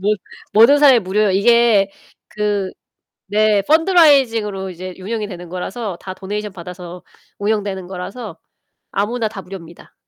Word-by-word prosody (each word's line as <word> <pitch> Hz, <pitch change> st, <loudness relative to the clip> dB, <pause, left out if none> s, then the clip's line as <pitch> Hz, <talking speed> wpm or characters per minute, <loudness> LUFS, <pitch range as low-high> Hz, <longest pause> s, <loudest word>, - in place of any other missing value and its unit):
모 210 Hz, +2 st, +2 dB, 0.4 s
모든 235 Hz, +7 st, +7 dB
사람이 270 Hz, -5 st, +6 dB
무료예요. 205 Hz, +2 st, +1 dB
이게 215 Hz, -1 st, +4 dB, 0.4 s
그 205 Hz, -2 st, -2 dB, 0.6 s
네 210 Hz, 0 st, +3 dB
펀드 320 Hz, -, +2 dB
라이징으로 230 Hz, -, +3 dB
이제 185 Hz, 0 st, -8 dB
운영이 210 Hz, +3 st, -4 dB
되는 180 Hz, -3 st, -9 dB
거라서 185 Hz, +2 st, -5 dB
다 185 Hz, -, -7 dB
도네이션 205 Hz, +1 st, -5 dB
받아서 180 Hz, 0 st, -9 dB, 0.4 s
운영되는 205 Hz, -3 st, -2 dB
거라서 190 Hz, +1 st, -7 dB, 0.5 s
아무나 220 Hz, +3 st, -1 dB
다 200 Hz, -3 st, -9 dB
무료입니다. 175 Hz, -2 st, -12 dB
205 Hz, 330 characters per minute, -18 LUFS, 185-225 Hz, 0.6 s, 모든